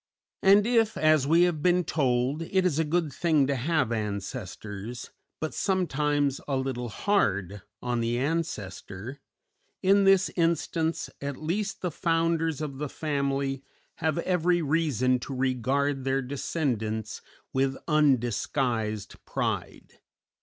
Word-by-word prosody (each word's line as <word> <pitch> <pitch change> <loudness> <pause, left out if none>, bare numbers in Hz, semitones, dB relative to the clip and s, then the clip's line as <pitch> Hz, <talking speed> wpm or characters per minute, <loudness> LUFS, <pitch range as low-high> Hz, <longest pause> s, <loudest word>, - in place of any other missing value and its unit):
And 200 +2 +6
if, 225 -2 +2
as 155 -3 +4
we 165 +3 +5
have 175 -4 +1
been 180 +2 +3
told, 135 -1 0
"it 185 +3 +1
is 160 -4 +1
a - - +3
good 160 -1 0
thing 155 -5 +2
to 140 +1 0
have 135 -1 0
ancestors, 105 +1 -5 0.3
but 155 - -3
sometimes 150 -7 0
a 135 -2 0
little 130 -2 -3
hard 100 - 0 0.2
on 120 -1 0
the 115 +1 0
ancestor," 125 - -3 0.6
in 195 +1 +5
this 195 -1 +5
instance 165 -1 0
at 140 -1 -4
least 195 +7 -2
the 180 - 0
founders 165 -1 0
of 140 -3 -5
the 150 -1 -3
family 140 -3 -1 0.4
have 160 0 0
every 175 0 +1
reason 135 -5 +2
to 135 +2 -6
regard 135 +2 0
their 135 0 0
descendants 120 -6 -2 0.3
with 135 0 +1
undisguised 120 - 0
pride. - - -4
140 Hz, 125 wpm, -27 LUFS, 125-165 Hz, 0.6 s, And